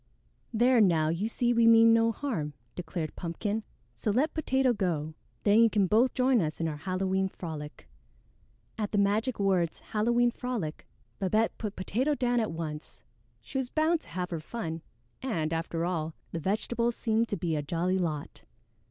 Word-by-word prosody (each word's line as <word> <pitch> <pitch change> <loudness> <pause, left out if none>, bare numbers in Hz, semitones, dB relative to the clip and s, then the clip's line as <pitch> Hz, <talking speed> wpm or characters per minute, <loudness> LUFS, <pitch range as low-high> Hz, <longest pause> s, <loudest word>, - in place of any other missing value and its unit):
"There, 240 +1 +4
now, 165 -6 +3
you 170 +6 -1
see 240 +1 +1
we 230 -1 +4
mean 230 0 +7
no 230 0 +4
harm," 205 - -3 0.2
declared 170 -3 -5
Pumpkin, 205 +6 -3 0.3
"so - - -3
let 265 +9 +2
Potato 265 -5 +2
go. 160 -7 -1 0.3
Then 210 +1 +5
you 230 - +6
can 205 -2 +2
both 225 +7 +3
join 255 -3 +3
us 155 -2 -3
in 165 - 0
our 150 -2 -3
Halloween 190 +3 0
frolic." 155 -5 -8 0.9
At 210 -1 -2
the - - +2
magic 210 +5 +1
words 185 -5 +1
"Halloween 240 +3 +1
frolic," 235 -11 -4 0.3
Babette 215 +4 +1
put 210 -3 -4
Potato 255 +10 0
down 245 -2 +1
at 220 - -1
once. 160 -2 -6 0.4
She 270 - -4
was 255 -2 -3
bound 315 +3 +2
to - - -15
have 180 -1 -4
her 165 - -2
fun, 165 -2 -5 0.4
and, 165 -12 -1
after 165 0 -2
all, 160 -3 -2 0.2
the 170 - -3
vegetables 230 +6 0
seemed 225 0 +1
to 205 - -1
be 165 -2 -1
a 150 - 0
jolly 175 +5 0
lot. 155 -5 -3
205 Hz, 170 wpm, -29 LUFS, 165-235 Hz, 0.9 s, mean